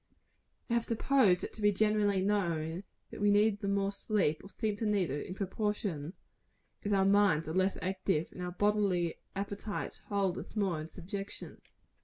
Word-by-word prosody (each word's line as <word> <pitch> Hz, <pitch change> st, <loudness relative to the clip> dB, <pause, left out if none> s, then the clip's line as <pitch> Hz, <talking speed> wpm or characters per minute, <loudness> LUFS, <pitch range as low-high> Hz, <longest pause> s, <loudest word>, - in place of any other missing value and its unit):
I 235 Hz, -, -1 dB
have 235 Hz, -1 st, +2 dB
supposed 225 Hz, -5 st, +3 dB
it -, -, -5 dB
to 220 Hz, -, -8 dB
be 205 Hz, 0 st, +5 dB
generally 205 Hz, -1 st, +2 dB
known, 175 Hz, -3 st, 0 dB, 0.3 s
that -, -, -8 dB
we 205 Hz, -, +4 dB
need 205 Hz, 0 st, +4 dB
the 200 Hz, -, -3 dB
more 200 Hz, 0 st, +1 dB
sleep, 200 Hz, -6 st, 0 dB
or 195 Hz, -, -11 dB
seem 215 Hz, 0 st, -2 dB
to 225 Hz, -, -2 dB
need 200 Hz, -7 st, +1 dB
it, 145 Hz, -, -3 dB
in 185 Hz, -, -6 dB
proportion 195 Hz, -5 st, -2 dB, 0.7 s
as 205 Hz, -, -1 dB
our 195 Hz, -1 st, +4 dB
minds 195 Hz, -6 st, +4 dB
are 160 Hz, -, -3 dB
less 190 Hz, +2 st, +2 dB
active, 185 Hz, -3 st, 0 dB
and 180 Hz, -, -9 dB
our 180 Hz, -, -2 dB
bodily 195 Hz, -4 st, +1 dB, 0.2 s
appetites 200 Hz, +1 st, -4 dB
hold 195 Hz, -3 st, 0 dB
us -, -, -10 dB
more 190 Hz, -7 st, 0 dB
in 155 Hz, -, -7 dB
subjection. 195 Hz, +3 st, -7 dB
200 Hz, 180 wpm, -32 LUFS, 180-205 Hz, 0.7 s, be